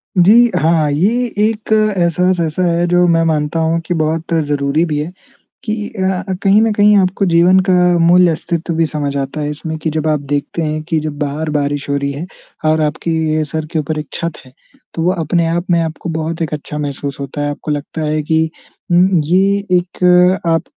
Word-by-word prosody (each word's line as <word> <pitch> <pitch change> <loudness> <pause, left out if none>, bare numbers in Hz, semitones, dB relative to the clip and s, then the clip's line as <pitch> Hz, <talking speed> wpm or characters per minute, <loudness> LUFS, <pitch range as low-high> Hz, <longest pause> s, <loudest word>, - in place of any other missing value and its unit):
जी 185 +3 +5 0.3
हाँ। 155 -1 +2
ये 210 +12 +1
एक 215 +1 -1
एहसास 185 -4 +1
ऐसा 160 +4 -2
है, 170 0 +1
जो 175 0 +3
मैं 165 -1 +3
मानता 155 0 0
हूँ 165 +1 +1
कि 175 - -1
बहुत 160 +1 -1
ज़रूरी 145 +2 0
भी 155 -3 -2
है 155 +4 -4 0.5
कि 215 -1 -3
अ, 190 -4 -2 0.2
कहीं 200 +1 +5
ना 225 0 +2
कहीं 210 0 +4
आपको 190 +1 +1
जीवन 175 +2 +4
का - - +4 0.3
मूल्य 175 +1 +5
अस्तित्व 165 +1 -3
भी 165 0 +2
समझ 145 -2 -3
आता 140 +2 -3
है 145 - -2
इसमें 160 +2 -5
कि 160 - -2
जब 155 0 -2
आप 155 -1 +1
देखते 145 +3 -2
हैं 155 -1 -2
कि 160 - +1
जब 155 -1 -5
बाहर 150 +2 -3
बारिश 145 0 -2
हो 140 - +1
रही 140 0 -2
है 145 +5 -6 0.4
और 155 0 +2
आपके 155 +1 -1
सर 160 -1 -3
के 160 - 0
ऊपर 155 +1 -3
एक 150 - -6
छत 170 -1 -3
है, 130 - -18 0.4
तो 165 - -3
वो 180 - +3
अपने-आप 170 0 -1
में 170 - +3
आपको 160 +1 -4
बहुत 160 +1 -3
एक 160 -2 -2
अच्छा 150 0 -6
महसूस 140 -1 -4
होता 140 +1 -5
है। 145 - -1
आपको 150 +1 -5
लगता 150 +2 -4
है 155 0 -1
कि 160 +1 +1 0.5
उम 180 0 +4
ये 195 +5 +2 0.2
एक 180 +1 +3
आप 165 -1 +2
165 Hz, 200 wpm, -16 LUFS, 150-180 Hz, 0.5 s, जी